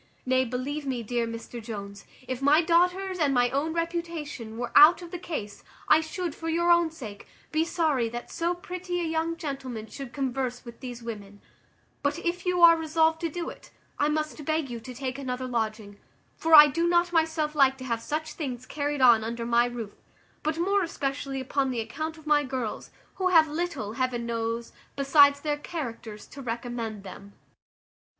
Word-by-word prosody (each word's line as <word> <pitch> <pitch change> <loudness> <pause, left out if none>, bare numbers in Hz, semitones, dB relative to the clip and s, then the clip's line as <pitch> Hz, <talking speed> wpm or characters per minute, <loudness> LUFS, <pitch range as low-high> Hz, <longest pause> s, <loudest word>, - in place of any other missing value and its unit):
Nay, 260 0 +2
believe 270 +4 -4
me, 250 -3 -2
dear 235 +1 -1
Mr 230 +1 -7
Jones, 200 -3 -7 0.2
if 255 0 -4
my 290 +3 +5
daughters' 360 +3 +2
and 285 -4 +2
my 245 0 +3
own 285 +4 0
reputation 335 -9 -4
were 240 0 -4
out 310 +5 +8
of 340 - -10
the 355 - -5
case, 215 - -6 0.2
I 315 - +6
should, 320 +1 -4
for 325 +2 -5
your 340 +1 +2
own 340 -1 +4
sake, 225 -11 -10 0.2
be 315 0 +2
sorry 310 -8 0
that 240 +1 -7
so 340 +1 -1
pretty 355 0 -4
a - - -1
young 325 0 -1
gentleman 265 -8 -5
should 270 +2 -8
converse 260 -2 -3
with 235 -1 -11
these 245 -2 -8
women; 205 -3 -8 0.6
but 285 +2 0
if 350 +1 -3
you 360 -1 +2
are 335 0 +10
resolved 320 0 +1
to 335 - -1
do 340 +2 -4
it, - - -15 0.3
I 295 - +3
must 305 0 -2
beg 310 -3 -1
you 235 - -5
to 250 +3 -9
take 260 +1 -4
another 255 -1 -3
lodging; 215 -4 -3 0.4
for 325 0 +5
I 300 0 +12
do 335 +4 0
not 345 0 +2
myself 320 -2 +1
like 270 -3 +4
to 260 - -9
have 230 -3 -2
such 310 +4 -3
things 255 -5 -5
carried 290 0 -2
on 235 -3 +7
under 230 +1 -4
my 235 0 +3
roof; 235 -4 -5 0.5
but 310 +1 -1
more 395 +4 +2
especially 275 -5 -3
upon 265 +1 0
the 250 -2 -2
account 310 +9 -4
of 315 - -15
my 300 -1 +3
girls, 255 -5 -4 0.3
who 370 - +1
have 325 -4 +6
little, 305 -9 -3
heaven 245 -1 -1
knows, 230 0 -3 0.2
besides 285 0 +5
their 295 -1 -1
characters, 240 -9 -6
to 275 - -9
recommend 230 -3 -4
them." 200 +1 -11
280 Hz, 185 wpm, -27 LUFS, 240-325 Hz, 0.6 s, I